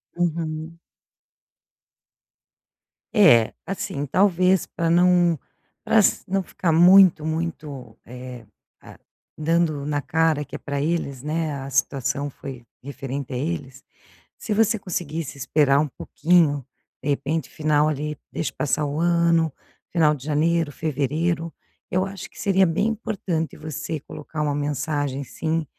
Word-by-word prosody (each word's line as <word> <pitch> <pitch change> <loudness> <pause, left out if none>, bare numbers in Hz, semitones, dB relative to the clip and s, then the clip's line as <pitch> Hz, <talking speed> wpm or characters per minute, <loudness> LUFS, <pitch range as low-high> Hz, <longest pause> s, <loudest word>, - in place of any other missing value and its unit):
Uhum. 165 -1 -2 2.4
É. 150 - +6
Assim, 145 -7 -3
talvez 185 +2 +3
pra 165 -1 -2
não 175 -1 +4 0.5
pra 225 - +2
ass 205 - +4
não 195 +1 0
ficar 170 -1 -1
muito 175 -1 +7
muito, 150 -7 -4
eh, 125 -1 -9 0.4
ah - - -14 0.4
dando 155 -2 +1
na 145 -1 -1
cara 160 -1 +1
que - - -9
é - - -3
pra 140 0 -3
eles, 145 -5 -2
né, 155 +1 -1
a 135 - -6
situação 140 0 0
foi 135 -2 -9 0.2
referente 135 -1 -5
a - - -2
eles, 135 -2 -4 0.5
se 220 - -3
você 220 0 +2
conseguisse 165 -5 -4
esperar 140 +1 +3
um 150 - +1
pouquinho. 150 -1 +1 0.4
De 145 - -2
repente 140 +2 -1
final, 150 0 +2
ali 150 0 -3 0.2
deixa 160 - -3
passar 150 0 0
o 145 +2 -3
ano, 170 -2 +3 0.4
final 160 -3 +4
de 135 - -12
janeiro, 155 +1 +1
fevereiro. 160 +3 -1 0.4
Eu 185 +1 +1
acho 195 -1 -8
que - - -16
seria 195 -3 +3
bem 175 +6 +1
importante 190 -7 -3
você 155 0 -5
colocar 150 +2 -9
uma 150 -1 0
mensagem 145 -1 -2
sim, 160 +4 -2
155 Hz, 135 wpm, -23 LUFS, 145-170 Hz, 2.4 s, muito